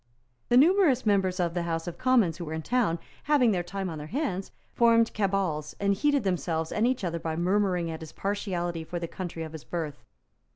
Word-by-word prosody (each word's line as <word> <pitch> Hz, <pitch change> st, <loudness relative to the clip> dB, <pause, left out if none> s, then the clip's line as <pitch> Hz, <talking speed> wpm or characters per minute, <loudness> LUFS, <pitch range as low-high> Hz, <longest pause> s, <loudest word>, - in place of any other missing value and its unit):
The 240 Hz, -, +5 dB
numerous 310 Hz, -4 st, +5 dB
members 190 Hz, -3 st, +2 dB
of 170 Hz, -2 st, 0 dB
the 175 Hz, -, -1 dB
House 165 Hz, -1 st, -2 dB
of 175 Hz, -1 st, -6 dB
Commons 235 Hz, -11 st, +3 dB
who 170 Hz, -, -5 dB
were 160 Hz, 0 st, -4 dB
in 160 Hz, -, -4 dB
town, 230 Hz, -8 st, +1 dB, 0.3 s
having 285 Hz, -6 st, +4 dB
their 180 Hz, -3 st, +1 dB
time 190 Hz, +2 st, -4 dB
on 160 Hz, -3 st, -5 dB
their 150 Hz, -, -7 dB
hands, 200 Hz, -, -2 dB, 0.2 s
formed 230 Hz, -1 st, +4 dB
cabals, 190 Hz, -7 st, -1 dB
and 200 Hz, 0 st, +2 dB
heated 285 Hz, +4 st, +2 dB
themselves 165 Hz, -4 st, -1 dB
and 220 Hz, +3 st, +2 dB
each 255 Hz, -4 st, -1 dB
other 170 Hz, -2 st, -2 dB
by 160 Hz, -1 st, -3 dB
murmuring 180 Hz, -1 st, +1 dB
at 160 Hz, -, -6 dB
his 160 Hz, -, -8 dB
partiality 180 Hz, -4 st, -2 dB
for 175 Hz, +2 st, -5 dB
the 170 Hz, -1 st, -3 dB
country 170 Hz, -2 st, -5 dB
of 160 Hz, -, -7 dB
his 160 Hz, -2 st, -9 dB
birth. 150 Hz, -8 st, -5 dB
185 Hz, 210 wpm, -28 LUFS, 165-220 Hz, 0.3 s, The